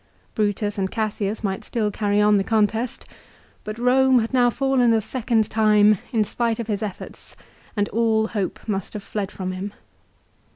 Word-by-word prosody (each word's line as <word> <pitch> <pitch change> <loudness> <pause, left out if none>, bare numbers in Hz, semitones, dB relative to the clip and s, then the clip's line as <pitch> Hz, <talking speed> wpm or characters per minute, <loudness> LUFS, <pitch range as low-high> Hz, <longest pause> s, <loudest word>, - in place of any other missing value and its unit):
Brutus 205 -1 -1
and 190 -1 0
Cassius 215 -1 -2
might 195 -2 -2
still 215 -3 -1
carry 205 0 0
on 210 0 +5
the 195 - +1
contest; 225 +3 0 0.6
but 215 - -5
Borne 255 +2 +4
had 230 +1 0
now 245 -2 +4
fallen 255 -2 +2
a 225 - +3
second 225 -1 0
time 210 -2 +4
in 225 -3 +2
spite 230 +2 -1
of 235 - -4
his 205 -2 -2
efforts, 210 -3 -7 0.4
and 205 0 +1
all 220 0 +1
hope 205 -1 -4
must 195 -3 -3
have 210 -2 -6
fled 200 -2 -4
from 185 -1 -4
him. 190 +2 -5
215 Hz, 170 wpm, -23 LUFS, 205-230 Hz, 0.6 s, on